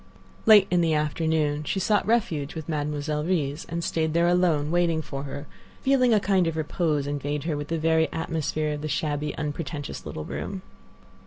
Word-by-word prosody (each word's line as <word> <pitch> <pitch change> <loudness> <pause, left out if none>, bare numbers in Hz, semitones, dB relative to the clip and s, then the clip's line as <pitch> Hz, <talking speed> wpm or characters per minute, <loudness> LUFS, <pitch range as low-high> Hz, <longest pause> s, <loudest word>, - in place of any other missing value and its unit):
Late 210 -3 +9
in 180 -1 +4
the 165 -2 +2
afternoon 150 -1 0
she 190 - -1
sought 205 +2 +2
refuge 175 -11 0
with 160 -2 -6
Mademoiselle 150 -1 -2
Reisz, 155 -4 -1
and 170 0 -3
stayed 160 -2 0
there 170 0 +4
alone, 170 -4 +2
waiting 170 -2 +2
for 140 -1 -5
her, 140 +1 -6 0.4
feeling 265 -2 +4
a 215 - +5
kind 190 -3 +2
of 165 -1 -2
repose 155 -2 0
invade 145 0 -2
her 160 -2 -1
with 145 0 -4
the 165 - -1
very 160 0 +2
atmosphere 155 -2 -2
of 145 - -5
the 155 - -3
shabby, 150 0 -2
unpretentious 150 -1 -4
little 75 - -6
room. 75 +6 -5
155 Hz, 180 wpm, -26 LUFS, 145-170 Hz, 0.4 s, Late